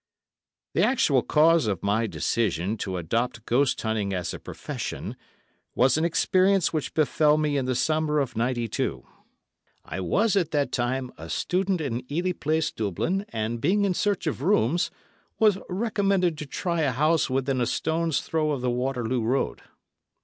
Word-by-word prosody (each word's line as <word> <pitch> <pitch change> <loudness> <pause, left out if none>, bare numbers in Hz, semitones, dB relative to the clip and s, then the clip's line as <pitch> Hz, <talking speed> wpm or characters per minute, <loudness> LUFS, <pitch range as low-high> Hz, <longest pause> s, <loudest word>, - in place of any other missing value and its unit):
The - - +2
actual 145 - +3
cause 160 -1 +4
of 100 -5 -2
my 105 +3 +1
decision 95 +2 -1
to 95 -3 -3
adopt 110 +6 -2
ghost 130 +3 +2
hunting 110 -3 -1
as 90 -2 -3
a - - -7
profession - - -6 0.6
was 130 +2 +4
an 155 - +1
experience 185 +2 +2
which 155 -3 -3
befel 150 0 +3
me 150 -1 0
in 135 -2 0
the 130 0 0
summer 155 +2 +1
of 135 -5 -1
'92. 120 -1 -1 0.8
I - - -5
was 205 - +1
at 180 -6 +2
that 145 -3 0
time 125 +1 -1
a 80 +1 -8
student 185 - 0
in 125 -2 -4
Ely 175 +5 0
Place, 160 -2 -1
Dublin, 140 - -2
and 115 +1 -3
being 200 +6 +2
in 190 - +1
search 200 0 0
of 155 -4 -2
rooms, 170 - +2 0.5
was 210 -4 +4
recommended 195 -3 +1
to 150 - -6
try 170 +3 -2
a 145 -4 +2
house 155 +5 +2
within 130 0 0
a 120 - +1
stone's 160 +2 0
throw 155 -2 0
of 135 - -3
the 125 -1 0
Waterloo 125 -1 -1
Road. 125 +5 -1
140 Hz, 165 wpm, -26 LUFS, 120-170 Hz, 0.8 s, cause